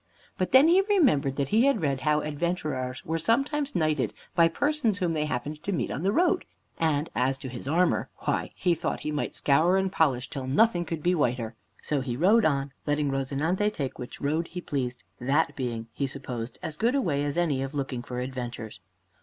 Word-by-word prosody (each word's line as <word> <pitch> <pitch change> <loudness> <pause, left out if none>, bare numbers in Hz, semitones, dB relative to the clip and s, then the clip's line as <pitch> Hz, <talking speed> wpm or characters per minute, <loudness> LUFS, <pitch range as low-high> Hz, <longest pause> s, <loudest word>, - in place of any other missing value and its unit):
But 185 - -1
then 265 +4 +7
he 360 +3 +6
remembered 195 - +3
that 140 -1 -1
he 225 +4 +4
had 275 -6 +3
read 140 -3 +1
how 150 0 +2
adventurers 150 -5 -3
were 165 0 -1
sometimes 275 - 0
knighted 155 -5 +1 0.2
by 170 -1 +5
persons 240 - 0
whom 175 -4 0
they 150 -1 0
happened 150 +2 -4
to 200 - -3
meet 150 -11 -1
on 140 - -3
the 195 +3 +2
road. 355 - +2 0.4
And 155 -1 +1
as 130 +2 +1
to 135 - -7
his 125 +1 -7
armor, 175 +5 +2
why, - - -1
he 180 -2 +2
thought 165 0 -3
he 150 - -3
might 150 - -2
scour 160 +7 +3
and 190 -1 0
polish 135 -8 +1
that - - -9
till 135 -3 -4
nothing 175 - +3
could 160 -2 -4
be 180 - +3
whiter. 125 -7 0 0.3
So 145 -3 0
he 125 -2 -3
rode 210 - +5
on, 140 -2 +1 0.2
letting 145 -1 +1
"Rozinante" 145 +9 0
take 140 -10 -4
which 125 - -7
road 155 +4 0
he 180 - -6
pleased, 125 -7 -3 0.2
that 140 +6 +1
being, 120 -4 -3
he 140 - -1
supposed, 125 -3 -6
as 155 - -4
good 235 - +2
a 275 - +3
way 145 - 0
as 145 +2 -2
any 155 -6 +1
of 135 +2 -4
looking 135 -3 -2
for 125 0 -5
adventures. 120 -4 -5
150 Hz, 210 wpm, -27 LUFS, 135-180 Hz, 0.4 s, then